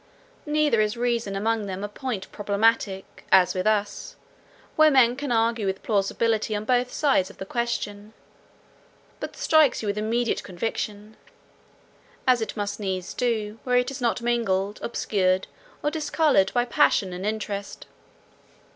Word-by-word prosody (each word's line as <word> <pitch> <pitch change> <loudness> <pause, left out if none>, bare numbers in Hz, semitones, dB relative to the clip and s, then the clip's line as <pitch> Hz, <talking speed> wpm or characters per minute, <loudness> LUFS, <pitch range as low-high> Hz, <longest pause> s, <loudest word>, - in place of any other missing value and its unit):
Neither 295 -6 +2
is 215 +2 0
reason 235 -4 -1
among 215 +1 -1
them 190 +1 -5
a - - -2
point 210 -2 -5
problematical, 205 -1 +1 0.3
as 185 -1 +5
with 185 +2 -1
us, 205 -1 -1 0.6
where 310 0 +6
men 250 -4 +5
can 280 -1 -4
argue 230 -2 +1
with 190 0 -3
plausibility 215 +1 0
on 210 +1 -3
both 250 +1 +1
sides 270 -11 +2
of - - -15
the 190 - -6
question, 215 -2 -3 1.1
but - - -6
strikes 310 -7 +3
you - - -3
with 205 +1 -1
immediate 230 +2 0
conviction; 210 +2 -5 1.1
as 250 -3 +4
it 220 0 -4
must 205 0 -3
needs 190 -3 -3
do, 225 -3 -2
where 250 -1 +2
it 250 +2 +1
is 265 - -7
not 235 0 0
mingled, 210 -4 0
obscured, 190 -5 0 0.4
or 295 - +1
discoloured, 295 - +2
by 245 0 +3
passion 195 -5 +2
and 180 +1 -6
interest. 205 -1 -4
220 Hz, 145 wpm, -25 LUFS, 200-240 Hz, 1.1 s, where